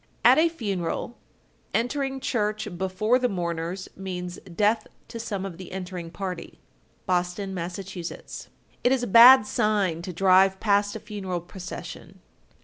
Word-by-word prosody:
At - - +8
a 335 +1 +4
funeral, 205 - -3 0.6
entering 270 +3 -1
church 215 -4 -1
before 190 +7 +1
the 250 -1 +1
mourners 170 0 -3
means 180 -2 -6 0.2
death 215 +3 +2 0.2
to 230 0 -7
some 205 -4 -4
of 185 -3 -7
the 185 - -9
entering 180 -2 -6
party. 185 -1 -6 0.5
Boston, 180 +2 -1
Mass. 175 -1 -4
1257. 185 -3 -8 0.3
It 245 - +4
is 265 -2 +2
a - - +1
bad 240 +2 +9
sign 205 -6 0
to 180 - -6
drive 190 +2 +4
past 205 -1 +2
a - - -4
funeral 200 -4 -4
procession. 180 +1 -9
195 Hz, 140 wpm, -25 LUFS, 180-220 Hz, 0.6 s, bad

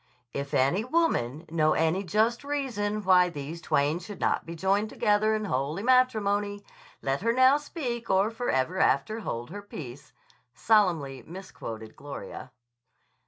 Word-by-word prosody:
"If 140 0 -3
any 140 +11 +2
woman 200 - 0
know 155 -2 +3
any 165 +5 +1
just 220 +7 +1
reason 230 -8 -2
why 180 -1 +5
these 155 +1 -7
twain 145 +3 +1
should 205 0 -9
not - - 0
be 170 - -6
joined 195 +5 +1
together 215 -1 +2
in 215 0 -2
holy 150 +3 -2
matrimony, 205 -5 +2 0.4
let 135 +2 -1
her 230 +3 +2
now 260 +3 +5
speak 250 -6 -5
or 195 +3 +3
forever 185 - -1
after 190 +12 +2
hold 120 - -5
her 205 +2 -6
peace," 140 -8 -9 0.4
solemnly 170 - +2
misquoted 115 - -9
Gloria. 145 -1 -8
195 Hz, 140 wpm, -28 LUFS, 150-220 Hz, 0.4 s, why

